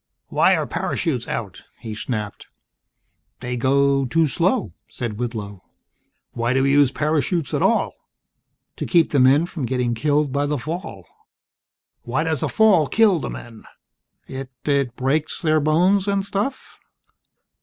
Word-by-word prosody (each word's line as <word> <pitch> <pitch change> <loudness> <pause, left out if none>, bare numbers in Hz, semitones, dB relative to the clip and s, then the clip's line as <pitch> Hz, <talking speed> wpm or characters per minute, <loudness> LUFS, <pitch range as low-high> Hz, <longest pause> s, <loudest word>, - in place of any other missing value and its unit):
"Why - - +4
are - - -1
parachutes 130 -9 -2
out?" 100 -5 -5 0.2
he 110 -2 -7
snapped. 105 -1 -5 0.9
"They 125 0 -4
go 135 +2 +2
too 160 +6 +2
slow," 180 - 0 0.2
said 115 -3 -5
Whitlow. 105 -5 -5 0.7
"Why 120 +1 -1
do 135 0 +2
we 140 - +2
use 145 -2 +5
parachutes 155 +2 -1
at - - 0
all?" - - +2 0.8
"To - - -4
keep 170 -2 +3
the 145 - +2
men 135 +5 +5
from 155 -7 -5
getting 125 -2 0
killed 145 +4 +1
by 145 +1 0
the 150 0 -1
fall." 135 - -6 1.0
"Why 130 +6 -1
does 160 -4 -1
a - - -1
fall 200 -9 +4
kill 210 -3 +3
the - - -4
men?" 115 -2 -10 0.6
"It 135 0 -7 0.2
It 140 -4 0
breaks 140 +4 -1
their 155 -2 +2
bones 180 +7 +2
and 200 -1 0
stuff." 205 +7 -4
140 Hz, 145 wpm, -22 LUFS, 125-160 Hz, 1.0 s, use